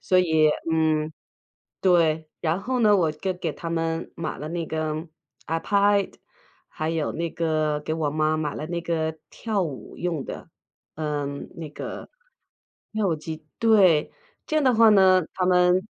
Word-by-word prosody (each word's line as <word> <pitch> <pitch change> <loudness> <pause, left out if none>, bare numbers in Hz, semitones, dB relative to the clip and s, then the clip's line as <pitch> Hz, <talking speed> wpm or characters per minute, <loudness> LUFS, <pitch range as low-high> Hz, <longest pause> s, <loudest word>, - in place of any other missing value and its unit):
所 185 - +3
以， 160 -4 +4 0.2
嗯 155 -1 +1 0.7
对， 160 -4 +3
然 165 +3 0
后 255 +3 -1
呢， 210 -3 +5
我 165 -5 +2
就 185 +5 -3
给 175 -3 -3
他 165 +2 -7
们 165 0 -2
买 160 -2 -4
了 150 - -6
那 170 -1 -3
个 155 0 -3 0.4
iPad， 200 +4 +2 0.6
还 155 +1 -3
有 160 -2 -1
那 170 +1 -3
个 155 -2 0
给 155 - -3
我 160 -2 -1
妈 155 +1 +1
买 150 -2 -2
了 155 - -4
那 170 0 -2
个 160 -2 -2
跳 215 -3 -2
舞 150 -7 -6
用 170 -5 -2
的， - - -8 0.5
嗯， 145 -2 -3
那 160 -2 -6
个， 145 - -7 0.9
跳 215 -2 +1
舞 165 - +1
机 155 0 -7
对。 195 -9 +4 0.3
这 310 - -3
样 305 - +2
的 260 -2 +4
话 230 0 +6
呢， 190 -3 +6
他 185 - 0
们 180 +1 +4
165 Hz, 185 characters per minute, -25 LUFS, 155-185 Hz, 0.9 s, 话